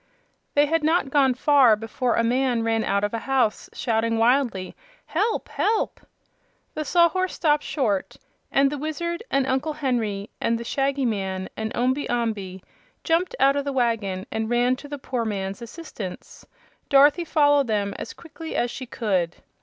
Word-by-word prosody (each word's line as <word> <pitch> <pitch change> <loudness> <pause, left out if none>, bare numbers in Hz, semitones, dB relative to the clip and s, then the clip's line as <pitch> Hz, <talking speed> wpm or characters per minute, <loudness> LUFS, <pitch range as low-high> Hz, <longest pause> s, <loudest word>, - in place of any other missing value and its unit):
They 290 0 +5
had 325 +1 0
not 310 -3 +2
gone 270 -3 +3
far 265 -4 +5
before 225 +3 -1
a 230 - +2
man 245 0 +1
ran 225 -1 +1
out 200 +1 0
of 205 - -1
a 230 - -1
house 255 -4 0
shouting 225 -1 0
wildly, 230 -5 +1 0.3
"Help! 415 +7 -1
Help!" 440 +1 0 0.7
The 310 - -3
Sawhorse 350 +4 +2
stopped 300 -3 +2
short 215 -13 -1 0.3
and 275 0 +3
the 295 - -4
Wizard 340 +5 -3
and 275 -1 +2
Uncle 265 +4 -1
Henry 235 -8 -2
and 230 - +1
the 235 - -6
Shaggy 275 +2 0
Man 190 -4 -2
and 220 0 -3
Omby 260 +4 0
Amby 210 -6 -2 0.4
jumped 350 +8 +1
out 275 +1 +5
of 285 - 0
the 280 - -2
wagon 215 -7 0
and 220 0 -2
ran 245 +1 +2
to 290 - -10
the 290 0 -5
poor 255 -3 -3
man's 195 -1 -3
assistance. 235 - -9 0.4
Dorothy 290 +5 +5
followed 290 -4 +3
them 205 -2 0
as - - -6
quickly 325 -1 -9
as 240 0 0
she 260 0 -7
could. 185 -8 -1
255 Hz, 165 wpm, -24 LUFS, 220-290 Hz, 0.7 s, They